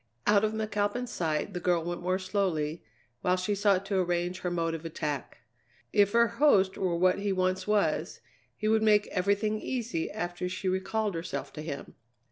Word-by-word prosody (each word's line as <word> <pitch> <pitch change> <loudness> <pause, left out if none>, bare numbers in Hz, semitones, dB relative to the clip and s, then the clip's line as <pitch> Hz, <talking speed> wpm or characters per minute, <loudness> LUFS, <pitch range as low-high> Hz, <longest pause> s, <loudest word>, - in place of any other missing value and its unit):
Out 205 0 +4
of 215 0 +1
McAlpin's 215 +3 -1
sight, 160 +1 -1
the 180 - -3
girl 175 -2 +1
went 175 +1 -4
more 185 +1 +1
slowly, 185 -5 -1 0.4
while 180 - +2
she 185 +3 -1
sought 200 -1 +2
to 195 -1 0
arrange 175 +1 -1
her 180 - -2
mode 165 -1 -1
of 165 -1 -5
attack. 155 -4 -4 0.5
If 200 -1 +4
her 235 0 +5
host 230 -6 +3
were 180 -3 0
what 185 +2 +3
he 200 0 -1
once 185 0 0
was, 210 -1 +1 0.4
he 215 - -2
would 220 0 +3
make 210 -1 +4
everything 200 +3 0
easy 235 -9 -2
after 175 +1 -3
she 185 +1 -4
recalled 200 +3 0
herself 165 +2 -5
to 155 - -6
him. 145 -3 -6
185 Hz, 180 wpm, -29 LUFS, 175-210 Hz, 0.5 s, her